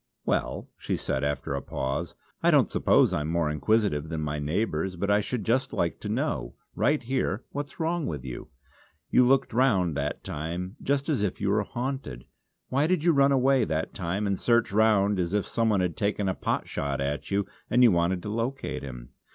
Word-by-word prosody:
"Well!" - - -1
she - - -2
said, 65 - -2
after 70 -1 -2
a 70 - -2
pause, 70 +6 -3 0.3
"I - - +4
don't - - +4
suppose - - +4
I'm 75 0 -1
more 80 -2 0
inquisitive 80 -2 +1
than 80 -2 -3
my 75 -1 -2
neighbours, 85 +3 -1
but 100 +3 -1
I 105 - +5
should 110 +1 -3
just 125 +6 0
like - - -1
to - - -5
know, - - -2 0.2
right 150 -1 +1
here, 120 -3 -1
what's 145 +2 -6
wrong 165 0 0
with 70 -4 -5
you. 65 -2 -6 0.6
You 125 - +6
looked 135 -2 +3
round 100 - +2
that 70 +1 -3
time 85 +6 -4
just 140 0 0
as 145 -9 +1
if 105 -3 -1
you 100 -1 0
were 105 +1 +3
haunted! 125 - -4 0.4
Why 140 +4 +2
did 180 -3 +1
you 175 - +5
run 140 -1 +4
away 135 -1 +4
that 80 -3 -2
time 95 +4 -2
and 100 -1 0
search 120 -3 +2
round 105 -2 +3
as 90 +2 0
if 105 - +1
some 115 -1 0
one 100 -3 +2
had 90 -3 -1
taken 100 -1 0
a 95 - +1
pot - - -2
shot 70 -1 -2
at 70 +2 -2
you 100 0 +1 0.2
and 125 - +4
you 120 - +7
wanted 85 +1 +1
to 105 - -4
locate 125 +4 -3
him? - - -8
100 Hz, 205 wpm, -27 LUFS, 80-125 Hz, 0.6 s, you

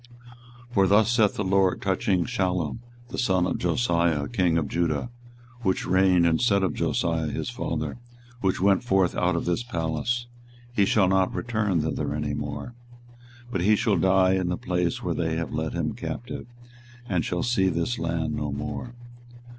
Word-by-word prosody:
24:022:011 - - -19
For 95 -3 +4
thus 105 +3 +4
saith 110 -4 +3
the 105 - -1
LORD 95 -1 +2
touching 95 -1 +1
Shallum 95 -7 -1 0.3
the - - -5
son 95 -7 +2
of - - -2
Josiah 85 -6 +1
king 85 -1 +1
of 75 -4 0
Judah, 85 - -1 0.5
which 95 -5 0
reigned 95 -1 +4
instead 100 +4 +3
of 90 -5 +1
Josiah 80 -2 0
his 75 - -3
father, - - -3 0.4
which 95 -5 0
went 100 +5 +3
forth 95 -6 +2
out 90 0 +1
of 85 - -2
this 90 +6 0
place; 85 +3 -2 0.5
He 100 -4 +3
shall 95 -1 +3
not 95 0 +2
return 105 -7 0
thither 75 -1 -2
any 75 -1 -2
more: 75 +10 -5 0.8
24:022:012 - - -14
But 95 - -1
he 105 +4 +4
shall 110 -1 +1
die 95 0 +4
in 95 -2 0
the 90 - -1
place 90 -1 -1
whither - - -1
they 80 -1 -1
have 85 0 -3
led - - -2
him - - -1
captive, - - -6 0.6
and 90 -4 0
shall 90 -1 -2
see 105 -6 +2
this 85 +8 -1
land 80 -1 -1
no 75 -1 -3
more. 120 - -5
95 Hz, 175 wpm, -26 LUFS, 85-100 Hz, 0.8 s, For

